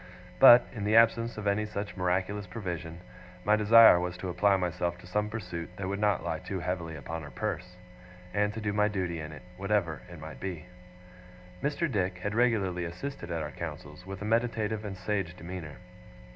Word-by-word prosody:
But, 125 -2 +10
in 105 -5 -5
the 105 +2 +2
absence 115 0 +4
of 105 - -5
any 100 +1 +2
such 105 -1 -5
miraculous 95 +2 -1
provision, 90 -5 -5 0.4
my 105 - +4
desire 110 -2 +8
was 90 0 -3
to 90 0 -5
apply 95 +3 +3
myself 90 -1 -2
to 90 - -14
some 105 +4 -1
pursuit 90 -6 -5
that 95 -1 -3
would 100 +1 -2
not 105 -4 +2
lie 80 -2 -2
too 95 +3 -5
heavily 85 -2 -3
upon 80 +2 -6
her 75 - -8
purse; 90 -2 -4 0.6
and 105 0 +2
to - - -3
do 105 -1 -1
my 105 0 +3
duty 90 -5 -2
in 75 0 -6
it, 75 -3 -11
whatever 95 -7 0
it 85 -2 -10
might 80 +1 -9
be. 90 -3 -5 1.0
Mr. 150 +4 0
Dick 95 - -1
had 105 +3 -3
regularly 105 -7 +1
assisted 90 +3 -6
at 85 -2 -2
our 75 - -5
councils, 75 +1 -7
with 95 +1 -7
a - - -4
meditative 110 -1 0
and 100 -3 -6
sage 95 -2 -2
demeanour. 85 -4 -7
95 Hz, 190 wpm, -29 LUFS, 85-105 Hz, 1.0 s, But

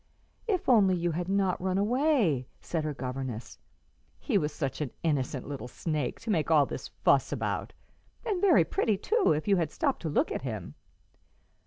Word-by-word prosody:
"If 390 -4 0
only 205 -7 +5
you 175 0 0
had 175 +3 -3
not 195 -2 +1
run 185 0 0
away!" 215 - +2
said 165 -2 -3
her 150 - -2
governess. 130 -2 -5 0.6
"He 255 - -2
was 155 -6 +2
such 135 -1 -3
an 145 - -1
innocent 140 -5 -1
little 140 -3 -5
snake 150 0 -3
to 230 -1 -2
make 165 -6 +1
all 150 -3 +5
this - - -6
fuss - - +2
about, - - -2 0.5
and 405 -6 -1
very 400 - +5
pretty 220 - +1
too, 440 - +2
if 155 +4 -1
you 200 -1 +4
had 165 -4 0
stopped 280 - -1
to 160 - -2
look 145 - +1
at - - -2
him." 110 - -5
170 Hz, 180 wpm, -29 LUFS, 140-215 Hz, 0.6 s, only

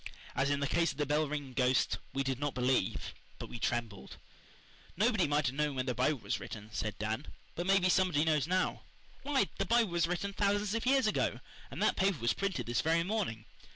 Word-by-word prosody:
As 140 +1 +1
in 145 0 0
the 140 - +1
case 170 0 +2
of 140 - -12
the 145 - 0
bell 150 +2 +1
ringing 145 -3 -4
ghost, 125 0 +2
we 135 - -1
did 135 -1 -2
not 145 -1 -2
believe 125 +1 0 0.2
but - - -7
we 120 - -7
trembled. 115 - -3 0.8
"Nobody 215 -3 +3
might 145 +1 +1
have 125 - 0
known 150 -1 0
when 130 -1 -1
the 125 - 0
Bible 130 +4 +1
was - - -3
written," 110 0 -8
said 110 -2 -3
Dan, 110 +7 -3 0.3
"but 175 +2 -4
maybe 195 -1 +4
somebody 180 -5 +3
knows 155 -2 +2
now. 185 +1 0 0.4
Why, 275 -8 +1
the 195 - +1
Bible 230 -3 +3
was 170 -1 +2
written 190 +3 -2
thousands 205 +1 +1
of 230 +2 -2
years 270 0 +4
ago, 215 - 0 0.3
and - - -3
that - - +2
paper 190 -2 +2
was 120 -2 +1
printed 195 -2 -2
this 120 +1 0
very 165 +1 +2
morning. 180 - -2
150 Hz, 215 wpm, -32 LUFS, 130-195 Hz, 0.8 s, maybe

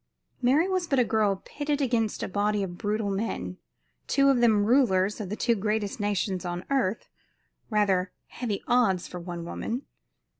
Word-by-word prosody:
Mary 275 +8 +4
was 370 -2 0
but 275 - +1
a 250 - +5
girl 210 -4 +1
pitted 290 0 -2
against 235 -6 0
a - - -1
body 205 +1 0
of 175 -2 -5
brutal 210 +1 -1
men, 195 - -3 0.5
two 275 0 +4
of 265 -3 +4
them 215 -4 +4
rulers 210 -5 +3
of 195 - -5
the 210 - -2
two 235 +1 +2
greatest 210 0 -1
nations 200 -3 -1
on 175 0 -4
earth 240 -6 0 0.6
rather 195 -4 +2
heavy 225 -5 -4
odds, 220 -8 +2
for 180 - -7
one 170 -1 -6
woman. 235 +9 -4
210 Hz, 165 wpm, -27 LUFS, 190-245 Hz, 0.6 s, a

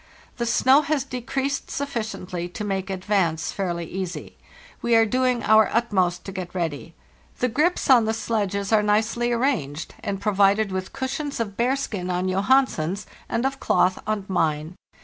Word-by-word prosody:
The 235 -1 -1
snow 260 +4 +5
has 300 -2 0
decreased 270 +2 -3
sufficiently 215 -10 -4
to 195 - -6
make 195 -1 -2
advance 185 -4 0
fairly 175 -3 -3
easy. 185 +1 -6 0.5
We 235 -1 +2
are 225 0 +6
doing 250 +1 +1
our 220 0 +5
utmost 190 -7 +1
to 195 - -5
get 185 -2 -6
ready. 165 -2 -3 0.4
The 250 - +1
grips 305 +9 +1
on 245 -4 +6
the 220 - 0
sledges 205 -3 -2
are 215 - +5
nicely 220 +3 +1
arranged, 230 - -1
and 195 -1 -3
provided 200 0 +3
with 185 0 -4
cushions 275 +2 -3
of 205 -4 -3
bearskin 235 -7 -1
on 180 +1 0
Johansen's 195 - +1 0.2
and 235 +3 0
of 270 0 -1
cloth 180 +1 +2
on 215 -2 -1
mine. 160 -2 -1
210 Hz, 155 wpm, -24 LUFS, 185-240 Hz, 0.5 s, are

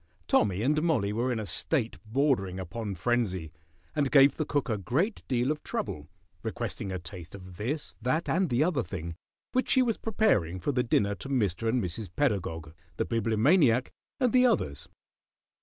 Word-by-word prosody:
Tommy 100 0 +2
and 150 +4 +2
Mollie 130 -12 +1
were 120 +4 0
in 115 - -1
a 110 - -4
state 115 - -1
bordering 110 -7 +1
upon 100 +3 -5
frenzy, 95 -5 -1 0.4
and 140 -2 +1
gave 140 0 +6
the 155 - -2
cook 145 -2 0
a 110 -3 -1
great 155 - 0
deal 125 +1 +1
of 150 - -3
trouble, 75 0 -4 0.3
requesting 95 - -4
a 95 - -2
taste 85 +1 -9
of 95 -2 -11
this, 140 +9 -3
that, 140 +8 0
and 185 0 +1
the 125 +3 +3
other 160 -6 +1
thing, 85 -6 -6 0.4
which 255 - 0
she 260 - +5
was 230 -3 0
preparing 105 - +1
for 145 - -1
the 125 -2 +1
dinner 105 -4 +1
to 135 - -8
Mr. 115 -4 +1
and 120 -1 +1
Mrs. 90 +3 -4
Pedagog, 85 - -1 0.2
the - - 0
Bibliomaniac, 115 - +3 0.3
and 250 -4 +2
the 255 0 +6
others. 75 - -1
115 Hz, 175 wpm, -29 LUFS, 95-145 Hz, 0.4 s, gave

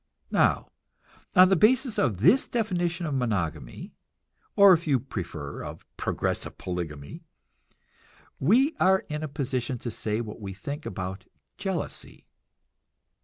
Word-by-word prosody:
Now, - - +2 0.6
on 185 0 +8
the 195 - +5
basis 240 - +3
of 105 -9 0
this 195 - +5
definition 175 -7 -1
of 150 - -2
monogamy 100 - -3 0.6
or, 200 -1 +8
if 170 -1 0
you 135 -4 +3
prefer, 85 - -6
of - - -8
progressive - - -2
polygamy 80 -6 -5 1.2
we 255 - +3
are 190 +1 +4
in 150 0 -3
position 130 -3 -2
to 120 0 -5
say 110 0 -2
what 110 -1 -6
we 95 -2 -6
think 140 - -6
about 95 +1 -5 0.3
jealousy. 190 -6 -4
135 Hz, 120 wpm, -27 LUFS, -, 1.2 s, on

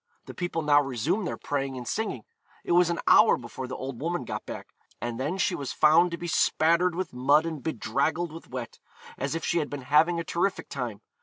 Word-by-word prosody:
The - - -9
people 175 -2 -3
now 145 -1 +5
resumed 145 - -1
their - - -4
praying 135 -2 -3
and 125 -2 -7
singing. 205 - -2 0.4
It - - -4
was 175 0 +5
an 170 - -1
hour 220 - +6
before 125 +1 -7
the 130 - -5
old 130 -1 -6
woman 175 +3 -2
got - - -5
back, - - -7 0.3
and 120 0 -4
then 150 +8 -2
she 185 - +1
was 140 -2 -4
found 160 +3 +5
to 170 - -5
be 175 - -7
spattered 170 +2 +2
with 185 -4 -3
mud 140 +5 +3
and 160 -4 -4
bedraggled 160 +3 -1
with 165 +1 -11
wet, 125 -2 -6 0.4
as 140 +3 -3
if 165 - -3
she 170 - +1
had 150 - -2
been 145 -2 -6
having 160 +5 +3
a - - -2
terrific 175 +4 -1
time. 120 -6 -5
155 Hz, 220 wpm, -27 LUFS, 135-170 Hz, 0.4 s, hour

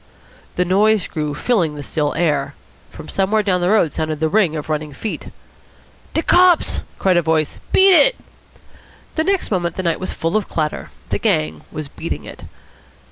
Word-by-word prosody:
The 180 - +1
noise 205 +2 +3
grew, 150 -2 -3
filling 170 - 0
the 145 - -7
still 150 0 -1
air. 145 -4 0 0.3
From 155 - -11
somewhere 205 +2 +1
down 185 -3 +1
the 175 - +1
road 205 -7 +3
sounded 155 -1 -3
the 160 0 +1
ring 180 -4 +2
of 150 - -5
running 155 -1 -3
feet. 210 +10 -5 0.9
"De 320 - +1
cops!" 360 -1 +4 0.2
cried 185 -2 +2
a - - +4
voice. 160 -2 0
"Beat 385 0 +6
it!" - - +6 1.1
Next 390 - 0
moment 175 -3 -1
the 185 - -3
night 170 -2 0
was 185 - -3
full 165 +3 -2
of 215 - 0
clatter. 155 -2 -3 0.2
The - - -1
gang 75 0 -1
was 155 -1 -5
"beating - - -6
it." - - -11
170 Hz, 175 wpm, -19 LUFS, 155-210 Hz, 1.1 s, Beat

